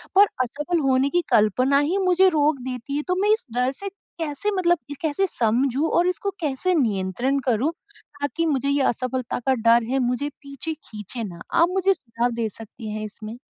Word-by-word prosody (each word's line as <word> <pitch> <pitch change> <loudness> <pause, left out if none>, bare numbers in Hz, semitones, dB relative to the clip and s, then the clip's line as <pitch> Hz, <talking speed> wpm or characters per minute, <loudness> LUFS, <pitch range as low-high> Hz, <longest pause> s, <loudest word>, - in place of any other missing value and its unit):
पर 400 - +8 0.2
असफल 295 +7 -2
होने 270 -1 +2
की 350 +3 +2
कल्पना 255 +5 +4
ही 315 +7 +1
मुझे 375 0 +4
रोक 300 -3 +2
देती 255 +3 -5
है 295 - -1
तो 365 - +1
मैं 415 - +2
इस 440 - -1
डर 250 +1 +2
से 395 +8 -5 0.3
कैसे 325 +7 -2
मतलब 350 -1 +3
ये 285 - -5
कैसे 320 +4 +1
समझूँ 260 +5 +1
और 350 +1 +4
इसको 380 +2 -1
कैसे 315 +3 0
नियंत्रण 240 - 0
करूँ 250 +6 +2 0.5
ताकि 330 +4 -1
मुझे 280 -2 +1
ये 280 0 +2
असफलता 255 0 -1
का 265 - +5
डर 230 0 +4
है 265 +1 +1
मुझे 250 +3 0
पीछे 280 +3 -5
खींचे 220 -3 -7
ना? 170 -4 -7
आप 340 +1 +4
मुझे 385 0 +3
सुझाव 240 -6 -2
दे 230 -1 -1
सकती 220 +1 -10
हैं 215 0 -4
इसमें? 215 +2 -8
275 Hz, 190 wpm, -23 LUFS, 235-330 Hz, 0.5 s, पर